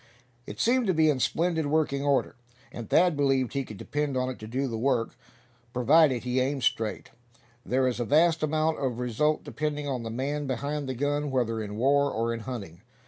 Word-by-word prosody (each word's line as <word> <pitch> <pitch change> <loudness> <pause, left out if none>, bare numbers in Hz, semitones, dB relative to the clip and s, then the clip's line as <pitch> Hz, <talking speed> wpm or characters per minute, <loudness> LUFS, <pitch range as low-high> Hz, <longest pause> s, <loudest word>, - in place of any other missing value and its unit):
It 105 - -8
seemed 245 0 +2
to 185 - +2
be 155 -1 +4
in 135 - -2
splendid 160 +2 0
working 145 -2 0
order, 140 -5 +1 0.4
and 115 -3 -8
Thad 175 -1 +4
believed 135 -3 +1
he 140 -1 -1
could 110 -5 -10
depend 145 +4 -2
on 130 0 0
it 130 - -7
to 110 - -8
do 130 +4 -2
the 115 - -4
work, 120 0 0 0.6
providing 130 0 +4
he 125 +1 -1
aimed 135 +1 -1
straight. 110 -1 -1 0.5
There 130 +1 +1
is 125 -1 -2
a 120 - -1
vast 160 +5 +3
amount 155 +1 0
of 130 -4 -2
result 125 +6 0
depending 150 -1 -3
on 130 -3 -2
the 115 - -5
man 140 +5 -3
behind 140 +2 -3
the 130 - -3
gun, 145 +3 -1
whether 115 -4 0
in 105 -1 -6
war, 140 +4 +3
or 115 +1 -1
in 115 - -4
hunting. 100 -7 -7
135 Hz, 200 wpm, -27 LUFS, 120-150 Hz, 0.6 s, be